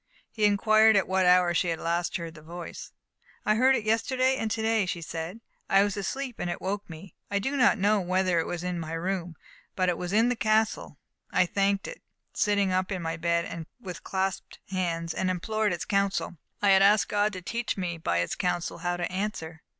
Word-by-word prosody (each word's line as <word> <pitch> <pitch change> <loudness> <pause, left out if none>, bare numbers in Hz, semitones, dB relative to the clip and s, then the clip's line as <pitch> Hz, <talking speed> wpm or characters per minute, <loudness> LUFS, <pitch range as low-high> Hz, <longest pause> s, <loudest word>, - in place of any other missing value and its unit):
He 215 -2 +1
inquired 215 +1 +5
at 195 - +3
what 190 -1 +2
hour 180 -1 +5
she 170 - +1
had 165 -1 0
last 170 +1 -1
heard 165 -1 -7
the 155 - -13
voice. 170 +2 -8 0.5
"I 215 - +4
heard 260 +4 +4
it 235 - -1
yesterday 255 +4 +1
and 225 - -2
to 220 +1 -2
day," 220 -3 +2
she 175 - -2
said. 165 +6 -6 0.3
"I 195 0 +5
was 205 -1 -1
asleep, 250 +5 -4
and 175 - -2
it 175 - -3
woke 200 +1 -4
me.... 165 +2 -10 0.2
I 200 - 0
do 270 +8 -1
not 250 -4 +4
know 205 +1 +3
whether 185 -1 +1
it 165 - -1
was 175 0 -4
in 180 -1 -2
my 160 0 -5
room, 175 0 -3 0.4
but 185 -1 +1
it 175 - -1
was 180 0 -4
in 225 +4 +4
the 250 - +1
castle.... 220 -1 0 0.3
I 185 - +4
thanked 200 +2 0
it, - - -9 0.3
sitting 200 -2 +2
up 185 +1 0
in 185 -3 -3
my 165 0 -2
bed, 170 0 -2
with 180 -7 -8
clasped 190 0 -3
hands, 170 -3 -1
and 185 - -1
implored 215 +4 0
its 175 - -3
counsel.... 200 -3 0 0.3
I 200 - +5
had 190 0 +6
asked 205 +2 +5
God 205 +1 +1
to 185 - -6
teach 235 +2 -2
me 175 -3 -3
by 85 - 0
its 85 - -2
counsel 175 -1 -2
how 175 +1 -1
to 175 - -1
answer." 185 -5 -4
190 Hz, 215 wpm, -27 LUFS, 175-210 Hz, 0.5 s, had